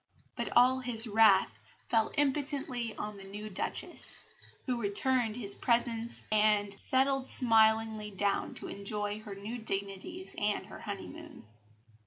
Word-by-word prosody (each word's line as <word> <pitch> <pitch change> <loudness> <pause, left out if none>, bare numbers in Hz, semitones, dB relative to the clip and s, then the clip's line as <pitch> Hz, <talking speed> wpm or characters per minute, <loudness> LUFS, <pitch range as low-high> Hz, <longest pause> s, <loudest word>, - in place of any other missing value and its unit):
But - - -3
all 255 +1 +5
his 245 -3 +2
wrath 215 -3 +4 0.3
fell 225 -2 +1
impotently 275 -5 0
on 210 -1 -6
the 195 - -10
new 210 +2 -8
Duchess, 185 - 0 0.5
who 250 -3 -2
returned 225 +2 0
his 205 -5 -1
presents 235 0 0
and 210 -1 +2
settled 265 +4 +1
smilingly 220 -2 +4
down 200 0 -2
to - - -5
enjoy 205 +1 -4
her 210 -2 -9
new 215 +5 -7
dignities 200 - -5
and 205 -2 -1
her 210 - -11
honeymoon. 290 - -9
220 Hz, 130 wpm, -30 LUFS, 205-250 Hz, 0.5 s, all